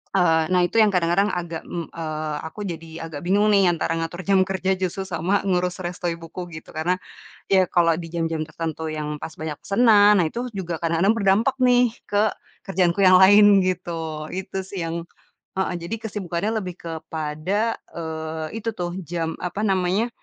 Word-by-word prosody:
eee, 165 -3 +4
nah 180 -1 +3
itu 225 - +1
yang 215 - +7
kadang-kadang 180 +1 +2
agak, 170 -2 -4
mmm, 170 -2 -5
eee, 155 -2 -4
aku 160 +6 -12
jadi 165 -3 -6 0.2
agak 160 -3 -7
bingung 205 +3 +3
nih, 195 -2 +5
antara 165 - -2
ngatur 175 +3 -4
jam 195 0 +3
kerja, 190 0 -1
justru, 190 +1 -2
sama 185 +2 0
ngurus 180 -2 0
resto 175 0 -4
ibuku, 170 +1 -5
gitu. - - -12
Karena, 165 +4 0 0.5
ya 190 -1 +4
kalau 170 -1 +4
di 165 0 -6
jam-jam 165 -2 -2
tertentu, 160 0 -4
yang, 150 -1 -3
pas 160 - -5
banyak 155 -1 -4
pesanan. 210 -2 +5
Nah, 170 - +3
itu 245 +7 -5
juga 185 -5 -4
kadang-kadang 170 +6 +2
berdampak 215 +5 +3
nih, 245 -2 +4 0.2
ke 205 +1 +2 0.3
kerjaanku 185 -2 +1
yang 185 - +7
lain, 205 0 +7
gitu, 165 -4 -3
itu 190 0 -4
sih, 190 -3 -5
yang 165 +1 -4 0.5
heeh. 190 -1 0
Jadi, 170 - -4
kesibukannya 195 -1 -2
lebih 180 -2 -6
kepada, 160 +6 -2 0.2
eee, 160 +4 -5
itu 230 - -1
tuh, 175 -4 -4
jam 165 -1 -3
apa 180 +3 -3
namanya, 190 +3 +1
175 Hz, 170 wpm, -23 LUFS, 165-195 Hz, 0.5 s, yang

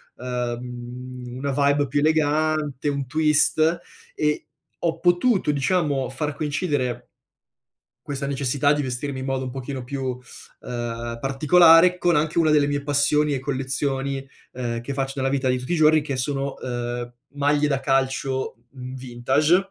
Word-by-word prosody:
uhm, 125 0 -5
una 140 +1 -2
vibe 140 +1 +2
più 145 +2 0
elegante, 155 -1 +1
un 140 -1 -2
twist 155 +3 +2 0.4
e 150 0 -1 0.4
ho 165 - 0
potuto, 175 0 +3
diciamo, 145 -3 0
far 145 +2 -3
coincidere 145 -5 -2 1.0
questa 140 -1 -3
necessità 140 +1 +1
di 145 0 0
vestirmi 130 +1 -4
in 130 - -4
modo 135 -1 -1
un 130 - -4
pochino 130 0 -5
più, 135 +2 -5 0.6
uhm, 120 -1 -5
particolare, 165 +6 +6
con 175 -2 +2
anche 155 +2 0
una 160 -2 +4
delle 150 -1 +4
mie 145 0 -1
passioni 145 +1 +2
e 130 - -2
collezioni, 135 0 -2 0.3
uhm, 120 -2 -3
che 135 +3 -5
faccio 135 0 -2
nella 135 -1 0
vita 135 -1 0
di 125 0 +2
tutti 125 +7 -5
i - - +2
giorni 155 0 +5
che 145 -2 -4
sono, 135 +1 -2
uhm, 120 -1 -4 0.2
maglie 145 +1 +2
da 135 -2 0
calcio 135 -1 0
v 130 -1 -8
vintage 135 +9 +1
140 Hz, 150 wpm, -23 LUFS, 130-150 Hz, 1.0 s, particolare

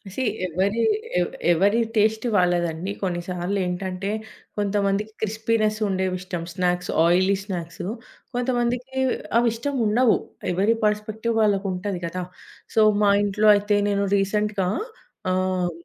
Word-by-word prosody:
See 265 - -1 0.2
ఎవరి 195 +6 0 0.4
ఎ - - +3 0.3
ఎవరి 200 +7 +3 0.2
taste 220 +2 +2
వాళ్లదండి. 175 -1 +1
కొన్ని 175 -3 -1
సార్లు 180 +2 -2
ఏంటంటే, 185 +2 -3 0.5
కొంతమందికి 205 +1 0
క్రిస్పీనెస్ 220 0 0
ఉండేవిష్టం. 185 -2 -2
స్నాక్స్, 180 0 0
ఆయిలీ 185 +3 +4
స్నాక్సు, 175 -5 -5 0.5
కొంతమందికి 245 +1 -1 0.4
అవి 235 0 +4
ఇష్టం 275 +5 -3
ఉండవు. 225 +2 +4 0.4
ఎవరి 200 +6 +2
పెర్స్పెక్టివ్ 215 +2 -1
వాళ్లకుంటది 195 -2 0
కదా! 180 +2 -4 0.5
సో, 220 - +5 0.2
మా 205 - +5
ఇంట్లో 210 +1 +3
అయితే 205 0 +1
నేను 200 0 +1
రీసెంట్‌గా 200 -1 0 0.6
ఆహ్, 185 -1 0
200 Hz, 115 wpm, -24 LUFS, 185-215 Hz, 0.6 s, సో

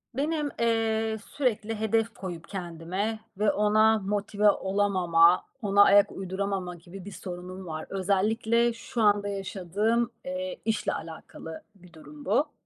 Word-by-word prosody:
Benim, 300 +1 0
eee, 225 -1 +1
sürekli 225 -5 -1
hedef 225 +1 +1
koyup 175 -6 -7
kendime 185 +4 -3 0.2
ve 210 0 +4
ona 215 +1 +4
motive 205 +1 +1
olamama, 185 -4 +3 0.2
ona 200 -1 +5
ayak 200 0 +5
uyduramama 190 -1 -3
gibi 175 +2 -11
bir 205 - -7
sorunum 185 0 -8
var. 155 0 -5
Özellikle 220 +5 +1
şu 230 +1 -4
anda 205 -1 +3
yaşadığım, 200 +4 -1
eee, 275 0 -4
işle 220 -1 0
alakalı 160 0 -8
bir 180 -2 -18
durum 285 - -13
bu. 290 +2 +1
205 Hz, 130 wpm, -27 LUFS, 185-225 Hz, 0.2 s, ona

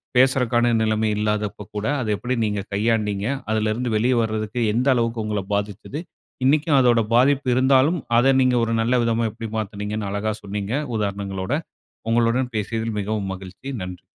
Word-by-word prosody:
பேசுறக்கான 125 -2 +3
நிலைமை 110 0 +1
இல்லாதப்ப 105 -1 -2
கூட 105 +1 -2 0.2
அதை 110 - -3
எப்படி 125 +4 -2
நீங்க 105 -1 -1
கையாண்டீங்க, 105 -1 0 0.2
அதிலிருந்து 110 +3 0
வெளியே 125 +4 +2
வரதுக்கு 110 +1 -2
எந்த 125 +4 +1
அளவுக்கு 115 -1 0
உங்களை 105 -2 -2
பாதிச்சிது, 105 - -3 0.5
இன்னைக்கும் 150 +1 +3
அதோட 120 -3 +4
பாதிப்பு 135 +2 +3
இருந்தாலும் 135 +6 +4 0.2
அத 135 +3 +5
நீங்க 130 -1 +3
ஒரு 115 0 0
நல்ல 120 +3 +1
விதமா 115 0 +1
எப்படி 115 +1 -7
மாத்தினீங்கன்னு 105 0 -3
அழகா 105 +2 -1
சொன்னீங்க 100 +2 -4 0.2
உதாரணங்களோட, 100 -1 -3 0.6
உங்களுடன் 120 +2 +2
பேசியதில் 110 +1 -2
மிகவும் 100 -1 -2
மகிழ்ச்சி 95 +8 -10
நன்றி. 90 -1 -7
110 Hz, 145 wpm, -22 LUFS, 105-125 Hz, 0.6 s, அத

